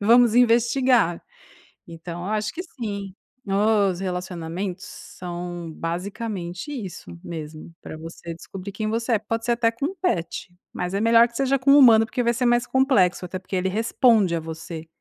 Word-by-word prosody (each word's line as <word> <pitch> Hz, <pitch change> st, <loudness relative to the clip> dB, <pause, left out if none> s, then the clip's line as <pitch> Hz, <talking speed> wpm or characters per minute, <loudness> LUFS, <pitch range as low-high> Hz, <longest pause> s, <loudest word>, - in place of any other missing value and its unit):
vamos 235 Hz, +2 st, +5 dB
investigar.". 240 Hz, -5 st, +3 dB, 0.7 s
Então 170 Hz, +1 st, -8 dB
eu 205 Hz, -, -3 dB
acho 215 Hz, 0 st, -1 dB
que 355 Hz, -, -5 dB
sim, 205 Hz, -, -6 dB, 0.3 s
os 200 Hz, -2 st, +2 dB
relacionamentos 180 Hz, +1 st, -4 dB
são 175 Hz, -3 st, -7 dB
basicamente 180 Hz, -, -5 dB
isso 185 Hz, -, -7 dB
mesmo, 155 Hz, 0 st, -8 dB
pra -, -, -8 dB
você 165 Hz, +1 st, -8 dB
descobrir 190 Hz, +4 st, -9 dB
quem 215 Hz, +2 st, -3 dB
você 230 Hz, +2 st, -1 dB
é. 220 Hz, -, +3 dB
Pode 225 Hz, +2 st, -3 dB
ser 240 Hz, -, +1 dB
até 230 Hz, -1 st, +2 dB
com 235 Hz, +5 st, -4 dB
um 385 Hz, -, -7 dB
pet, 180 Hz, -, -2 dB, 0.2 s
mas 180 Hz, +1 st, -3 dB
é 200 Hz, -, 0 dB
melhor 230 Hz, +1 st, +6 dB
que 235 Hz, -, -22 dB
seja 275 Hz, 0 st, +1 dB
com 275 Hz, +2 st, +3 dB
um 290 Hz, -, +8 dB
humano, 225 Hz, -4 st, +7 dB
porque 245 Hz, +2 st, -2 dB
vai 235 Hz, 0 st, +2 dB
ser 250 Hz, +1 st, -1 dB
mais 240 Hz, 0 st, +3 dB
complexo, 255 Hz, -10 st, +2 dB
até 185 Hz, +1 st, -5 dB
porque 190 Hz, +1 st, -6 dB
ele 185 Hz, +1 st, 0 dB
responde 220 Hz, -2 st, +3 dB
a 165 Hz, -, -1 dB
você. 160 Hz, 0 st, -7 dB
200 Hz, 175 wpm, -23 LUFS, 175-235 Hz, 0.7 s, um